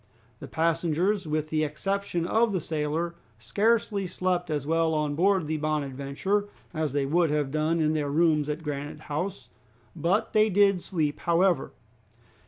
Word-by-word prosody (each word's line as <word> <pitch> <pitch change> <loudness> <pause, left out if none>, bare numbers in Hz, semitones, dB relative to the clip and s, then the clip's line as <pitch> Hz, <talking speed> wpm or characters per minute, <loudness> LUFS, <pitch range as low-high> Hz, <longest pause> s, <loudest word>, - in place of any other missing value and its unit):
The - - -8
passengers, 170 +4 0
with 155 0 -1
the 155 0 +1
exception 175 +3 -2
of 225 +4 +2
the 185 - +1
sailor, 160 +2 -2 0.2
scarcely 200 - +1
slept 180 -1 -1
as 145 -3 -2
well 165 +1 +1
on 150 -1 0
board 185 +2 +2
the 155 +1 -2
"Bonadventure" 150 +7 -1 0.2
as 155 -3 -1
they 140 -1 +1
would 165 +3 +2
have 145 -2 0
done 155 +2 +1
in 155 -1 +2
their 150 -2 -1
rooms 155 -1 +2
at 150 +2 -3
Granite 145 -1 -5
House, 150 - -4 0.5
but 185 +6 0
they 215 0 +4
did 200 -2 +4
sleep 155 -5 -2
however. 170 -2 +2
160 Hz, 155 wpm, -27 LUFS, 150-185 Hz, 0.5 s, they